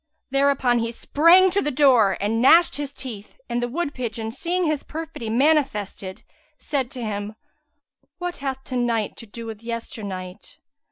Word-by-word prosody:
Thereupon 275 -3 +3
he 230 0 -2
sprang 335 +9 +5
to 400 +2 +1
the 295 - 0
door 250 -8 +4
and 220 +3 0
gnashed 330 +6 +6
his 290 -1 -4
teeth, 245 - -8
and 240 0 -1
the 245 - 0
wood 290 +3 -3
pigeon, 225 -3 -4
seeing 355 +8 -1
his 305 -3 0
perfidy 315 -7 -6
manifested, 225 -8 0 0.3
said 270 -4 -2
to 255 -3 -6
him, 210 0 -4 0.8
"What 355 -1 -4
hath 265 -1 -4
to 255 - -6
night 235 -4 0
to 230 - -10
do 230 +3 -9
with 220 -1 -7
yester 230 -1 -5
night? 185 -1 -7
245 Hz, 165 wpm, -23 LUFS, 220-290 Hz, 0.8 s, gnashed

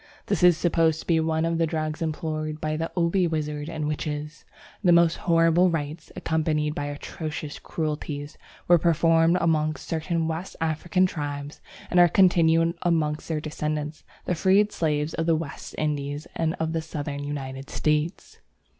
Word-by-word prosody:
This 200 - -1
is 180 -2 +6
supposed 165 -2 +2
to - - -14
be 165 -2 +3
one 160 0 +1
of 165 0 0
the 165 - +2
drugs 155 -1 -3
employed 155 -1 -3
by 155 0 -2
the 165 +1 -3
Obi 175 +1 +2
wizards 150 -2 -3
and 155 -2 -3
witches. 150 0 -4 0.4
The 180 - +5
most 170 -1 +5
horrible 165 +1 +3
rites, 155 -1 -4
accompanied 155 -1 0
by 145 - -3
atrocious 150 +1 -6
cruelties, 150 -2 -4 0.3
were 175 -1 +6
performed 165 +1 +3
amongst 155 -2 0
certain 165 0 -1
West 165 +3 -4
African 165 +3 +1
tribes 145 -4 -5 0.3
and 180 - +4
are 175 - +8
continued 165 -2 +4
amongst 160 -3 0
their 160 -2 -1
descendants, 150 0 -4 0.2
the - - 0
freed 195 +4 +3
slaves 150 -3 -1
of 165 0 -2
the 165 - +4
West 155 -3 -6
Indies 145 0 -2
and 165 +1 -1
of 160 -1 -2
the 165 - 0
Southern 145 -3 -5
United 135 -2 -5
States. 150 +3 -1
160 Hz, 160 wpm, -25 LUFS, 150-165 Hz, 0.4 s, are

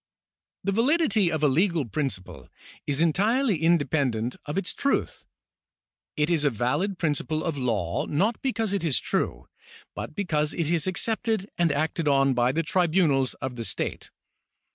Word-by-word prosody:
^ - - -69 0.6
The 200 - 0
validity 230 - +3
of 155 -1 -2
a - - +6
legal 165 +1 +2
principle 115 -7 -4 0.4
is 140 +1 0
entirely 205 - +2
independent 140 -8 +1
of 150 - -3
its 195 - -1
truth. 280 - -1 0.9
It 150 +3 +1
is 160 -3 +2
a 145 - +4
valid 145 - -1
principle 155 -1 -1
of 165 -3 -2
law, 110 -11 -1
not 205 +10 0
because 225 -6 -1
it 200 - -1
is 155 -6 +1
true, - - -2 0.5
but - - -7
because 155 -6 -1
it 165 -2 -1
is 170 0 +1
accepted 220 +1 -1
and 170 -2 +2
acted 155 +2 -1
on 135 -1 +4
by 120 0 +2
the 165 +4 0
tribunals 155 -5 +2
of 130 -1 -6
the 115 - -4
state. - - -3
160 Hz, 160 wpm, -26 LUFS, 140-190 Hz, 0.9 s, a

